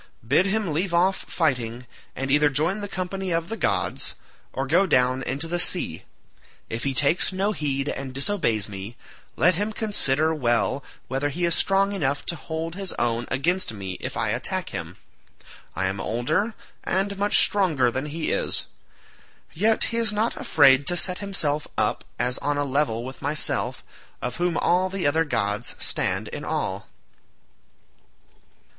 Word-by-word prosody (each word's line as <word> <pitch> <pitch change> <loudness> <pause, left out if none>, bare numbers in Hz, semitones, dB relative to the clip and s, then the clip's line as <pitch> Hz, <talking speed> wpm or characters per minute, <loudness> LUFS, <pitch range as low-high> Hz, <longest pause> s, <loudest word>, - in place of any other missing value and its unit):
Bid 185 +10 +4
him 200 -5 0
leave 170 +3 0
off 185 +3 +4
fighting, 125 -6 -1 0.3
and 135 0 -3
either 145 +1 +5
join 160 +9 0
the 205 - -4
company 190 0 -4
of 165 0 -1
the 225 - -2
gods, - - -1 0.4
or 135 - -2
go 175 +8 +3
down 130 -4 +3
into 140 +5 -2
the 175 +1 -2
sea. 175 - +1 0.6
If 115 +3 -4
he 135 -1 -1
takes 145 +8 +3
no 195 +2 0
heed 140 -6 -2
and 135 -2 -4
disobeys 135 - 0
me, 100 +3 -8 0.4
let 180 +3 +4
him 205 +5 -1
consider 160 -9 +1
well 120 -1 0 0.2
whether 135 +2 -1
he 175 +5 -1
is 170 - +2
strong 195 +3 +3
enough 145 -7 -1
to 170 - -1
hold 160 +1 -5
his 195 0 -3
own 120 0 -1
against 170 +4 0
me 95 -3 -6
if - - -5
I - - 0
attack - - -1
him. - - -6 0.8
I 95 - 0
am 95 +1 -2
older 155 - 0 0.3
and 195 +2 0
much 205 +1 +4
stronger 160 -12 +3
than 130 +4 -3
he 155 +2 -3
is; - - +2 0.9
yet 215 +6 +3
he - - +1
is 230 -2 +2
not 215 +2 0
afraid 135 -2 +5
to 175 - +3
set 180 +1 +1
himself 155 -7 0
up - - 0
as 125 +1 0
on 145 +1 -1
a 145 - 0
level 130 -4 0
with 130 +1 -9
myself, 145 +2 -1 0.4
of 125 0 -4
whom 175 -1 0
all 185 +2 +2
the 190 -1 -3
other 160 +3 +3
gods 105 -4 -1
stand - - -1
in - - -6
awe." - - -2
155 Hz, 165 wpm, -24 LUFS, 130-185 Hz, 0.9 s, either